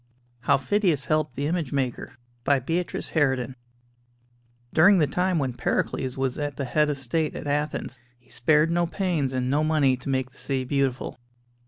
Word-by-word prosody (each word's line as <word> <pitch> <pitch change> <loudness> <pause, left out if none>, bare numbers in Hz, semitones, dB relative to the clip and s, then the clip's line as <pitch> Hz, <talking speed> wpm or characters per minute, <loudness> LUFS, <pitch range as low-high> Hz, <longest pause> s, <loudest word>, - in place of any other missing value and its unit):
HOW - - +3
PHIDIAS 155 0 +1
HELPED 155 -4 0
THE 140 - -2
IMAGE 160 -3 -1
MAKER 130 -1 -2 0.3
By 140 +2 +3
Beatrice 165 +7 -2
Harraden 130 -5 +1 1.2
During 190 +5 +6
the 160 - +4
time 180 +5 0
when 135 -4 -1
Pericles 125 +2 -1
was 135 0 -1
at 145 -2 -3
the 140 - -2
head 150 +4 +2
of 145 - 0
the 135 - -8
state 155 +5 -1
at - - -6
Athens 145 -2 -2 0.2
he 120 - -27
spared 150 +6 +3
no 170 0 +2
pains 170 -7 -1
and 130 -1 -1
no 150 +2 +2
money 150 -4 +3
to 125 - -7
make 130 -1 -1
the - - -17
city 135 -2 -1
beautiful. 130 -1 -1
140 Hz, 180 wpm, -25 LUFS, 130-155 Hz, 1.2 s, During